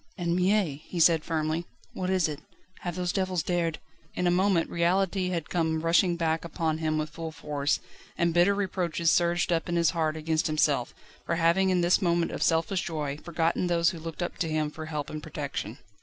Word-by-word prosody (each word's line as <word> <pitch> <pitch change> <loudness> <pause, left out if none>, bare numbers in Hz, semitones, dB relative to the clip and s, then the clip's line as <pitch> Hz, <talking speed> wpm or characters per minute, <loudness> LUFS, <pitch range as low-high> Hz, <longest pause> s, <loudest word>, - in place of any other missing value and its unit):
"Anne 170 -2 0
Mie," 180 -5 +1
he 175 - -4
said 165 -1 +5
firmly, 160 +1 -1 0.3
"what 185 0 -3
is 185 -3 +2
it? 150 -2 -5 0.4
Have 175 -2 -4
those 180 -1 -1
devils 185 -4 0
dared 170 -3 0 0.2
..." - - -32
In 180 - -1
a 175 - +4
moment 180 -2 +2
reality 185 +2 +1
had 170 -4 -3
come 160 -2 0
rushing 170 +2 +3
back 165 -1 0
upon 160 -1 -2
him 155 -1 0
with 155 0 -2
full 165 0 -6
force, 145 -2 -1 0.4
and 170 -1 +2
bitter 175 +4 +4
reproaches 175 -4 0
surged 175 0 +2
up 165 +2 -1
in 175 - 0
his 170 -2 +3
heart 160 -2 -1
against 160 0 0
himself, 150 -5 +1 0.3
for 170 - +1
having 170 +3 +3
in 180 -1 +2
this 175 +4 +3
moment 170 -2 +1
of - - -5
selfish 165 +3 +2
joy 150 -5 -3
forgotten 170 +1 0
those 170 0 +3
who 170 - -8
looked 165 +2 -5
up 175 - -5
to 165 - 0
him 155 -1 0
for 155 0 -7
help 150 -2 -4
and 155 - -5
protection. 140 -7 -5
170 Hz, 205 wpm, -28 LUFS, 155-175 Hz, 0.4 s, said